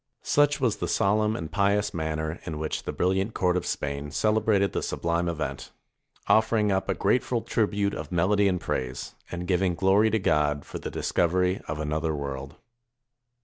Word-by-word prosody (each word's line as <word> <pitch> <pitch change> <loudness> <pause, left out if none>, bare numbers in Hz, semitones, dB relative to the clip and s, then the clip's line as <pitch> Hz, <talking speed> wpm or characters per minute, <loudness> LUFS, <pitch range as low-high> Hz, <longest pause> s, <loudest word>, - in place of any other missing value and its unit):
Such 145 0 +3
was 125 -5 +1
the - - -2
solemn 105 +1 +2
and 80 -5 -5
pious 100 +3 +1
manner 80 0 -3
in 80 -3 -5
which 80 0 -3
the - - -2
brilHant 95 +4 0
court 90 -1 +2
of 90 - -1
Spain 70 +1 -3
celebrated 105 0 +2
this - - -2
subHme 85 +1 0
event; 80 -2 -4 0.5
offering 110 -1 +3
up 95 0 0
a - - +1
grateful 125 -1 +1
tribute 100 -2 0
of 75 -1 -6
melody 100 +4 +3
and 90 -2 +1
praise, 65 -5 -3 0.2
and 85 0 -5
giving 90 -1 +1
glory 100 +4 +4
to 110 - +2
God 75 -6 +1
for - - -7
the - - -5
discovery 90 +2 +1
of 75 +1 -4
another 75 +1 -1
world. 70 -1 -5
90 Hz, 170 wpm, -26 LUFS, 80-105 Hz, 0.5 s, glory